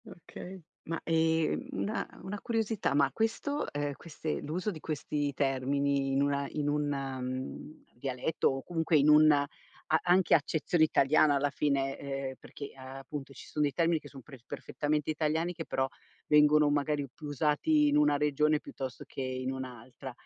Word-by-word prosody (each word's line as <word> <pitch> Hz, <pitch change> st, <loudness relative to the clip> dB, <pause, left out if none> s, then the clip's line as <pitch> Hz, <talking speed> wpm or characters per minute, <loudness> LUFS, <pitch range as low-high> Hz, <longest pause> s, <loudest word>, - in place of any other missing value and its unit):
Okay. 185 Hz, +1 st, -10 dB, 0.3 s
Ma 165 Hz, +1 st, -3 dB
ehm, 160 Hz, +7 st, +1 dB
una 220 Hz, -4 st, -2 dB, 0.2 s
una 195 Hz, +2 st, -5 dB
curiosità, 225 Hz, -, 0 dB
ma 140 Hz, -1 st, +3 dB
questo 285 Hz, +6 st, -1 dB
ehm, 145 Hz, 0 st, -2 dB
queste 155 Hz, +1 st, -5 dB
l'uso 180 Hz, +7 st, -2 dB
di 160 Hz, -, -8 dB
questi 150 Hz, -1 st, -2 dB
termini 135 Hz, +1 st, 0 dB
in 135 Hz, +1 st, +3 dB
una 140 Hz, 0 st, 0 dB
in 150 Hz, -1 st, -2 dB
un, 150 Hz, 0 st, 0 dB
mhmm, 135 Hz, +1 st, -4 dB, 0.2 s
dialetto 135 Hz, +4 st, -1 dB
o 135 Hz, 0 st, -1 dB
comunque 165 Hz, -2 st, +1 dB
in 145 Hz, +1 st, +4 dB
una 150 Hz, -1 st, +7 dB, 0.5 s
a 160 Hz, -, +6 dB
anche 180 Hz, +1 st, +4 dB
accezione 160 Hz, +2 st, +2 dB
italiana 150 Hz, 0 st, +4 dB
alla 140 Hz, +1 st, +1 dB
fine, 135 Hz, -1 st, 0 dB
ehm, 135 Hz, -1 st, -4 dB
perché 140 Hz, -, -9 dB
appunto 135 Hz, +1 st, -8 dB
ci -, -, -11 dB
sono 150 Hz, -, -1 dB
dei 140 Hz, -, -1 dB
termini 165 Hz, -1 st, +2 dB
che 145 Hz, -, -12 dB
sono 135 Hz, -3 st, -12 dB
pref 135 Hz, -5 st, -13 dB
perfettamente 150 Hz, 0 st, -2 dB
italiani 160 Hz, +3 st, 0 dB
che -, -, -6 dB
però 130 Hz, 0 st, 0 dB, 0.4 s
vengono 150 Hz, 0 st, +5 dB
magari 145 Hz, 0 st, 0 dB
più 150 Hz, -, -9 dB
usati 155 Hz, -, +2 dB
in 295 Hz, -, +3 dB
una 300 Hz, -, +4 dB
regione 150 Hz, +1 st, +2 dB
piuttosto 130 Hz, -4 st, -7 dB
che -, -, -7 dB
in 130 Hz, 0 st, -2 dB
un'altra. 130 Hz, 0 st, -7 dB
145 Hz, 165 wpm, -31 LUFS, 135-160 Hz, 0.5 s, una